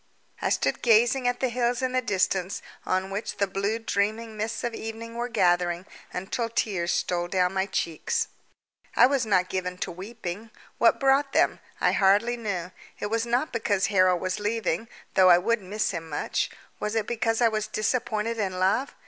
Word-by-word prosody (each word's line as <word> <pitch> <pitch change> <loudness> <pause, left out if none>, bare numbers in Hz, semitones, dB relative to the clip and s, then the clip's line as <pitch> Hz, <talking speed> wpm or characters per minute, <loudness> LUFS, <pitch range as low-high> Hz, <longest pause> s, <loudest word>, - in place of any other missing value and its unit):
I - - +1
stood - - 0
gazing 240 +2 +4
at 245 0 0
the 260 - +2
hills 245 +1 0
in 255 - +1
the 255 0 +1
distance 190 -3 0 0.2
on 185 +1 0
which 200 +3 -4
the 200 - +2
blue 200 +3 -1
dreaming 220 +1 -1
mists 215 +1 -3
of 240 -1 -2
evening 225 +1 -6
were 240 +1 -3
gathering, 175 -4 +2 0.3
until 210 +6 -3
tears 190 -6 0
stole 175 -1 0
down 180 0 +1
my 190 0 0
cheeks. 190 - -1 0.7
I - - +8
was 260 -3 +1
not 185 -3 +3
given 180 -1 -3
to - - -3
weeping. 200 +2 -7 0.3
What 230 - +4
brought 275 +1 +3
them? - - +3 0.2
I - - +3
hardly 205 +5 +3
knew. 190 -6 -4 0.3
It 205 - -3
was 230 +1 0
not 245 +6 0
because 205 -3 0
Harold 185 -2 +4
was 185 +2 -2
leaving, 210 -1 -1 0.3
though 185 -1 +6
I 175 - +8
would 230 +5 +1
miss 205 +3 -1
him 165 -3 -6
much. 145 - -1 0.3
Was 210 +1 -2
it 220 -2 +1
because 225 -1 0
I 235 -2 +5
was 215 -1 -2
disappointed 220 0 -1
in 190 -3 -1
love? 195 +9 +1
215 Hz, 180 wpm, -26 LUFS, 185-230 Hz, 0.7 s, I